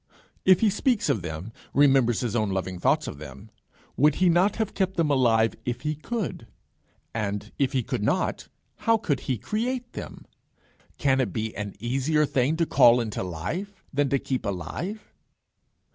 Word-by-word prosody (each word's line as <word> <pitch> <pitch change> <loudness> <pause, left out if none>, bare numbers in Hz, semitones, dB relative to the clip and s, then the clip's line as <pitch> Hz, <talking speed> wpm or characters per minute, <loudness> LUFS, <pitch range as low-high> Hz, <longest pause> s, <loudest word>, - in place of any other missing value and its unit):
If 185 -1 +6
he 220 -3 +4
speaks 215 - +1
of 120 -9 +1
them, 85 +6 -6 0.2
remembers 135 -5 +4
his 120 -3 -2
own 110 -3 +1
loving 95 -1 -3
thoughts - - +2
of 70 - -7
them, 70 -3 -11 0.4
would 150 +1 +4
he 185 -1 +3
not 180 +4 +3
have 220 -2 -2
kept 190 -1 -1
them 160 -3 +2
alive 115 -4 +3
if 120 0 -3
he 150 0 -1
could; 155 - -4 0.7
and 105 -2 -3
if 140 -1 +1
he 130 -2 +1
could - - -3
not, - - 0 0.3
how 230 0 +3
could 155 -10 -1
he 130 - +1
create 240 - -3
them? - - -8 0.7
Can 135 -2 +2
it 115 -7 -1
be 110 +2 -3
an 105 -1 -5
easier 135 +6 +1
thing 140 +3 +1
to 165 - +2
call 125 -5 +6
into 110 -3 -3
life 100 - -5
than 140 0 +1
to 140 - +2
keep 130 -1 -3
alive? 145 - -5
135 Hz, 175 wpm, -26 LUFS, 110-175 Hz, 0.7 s, If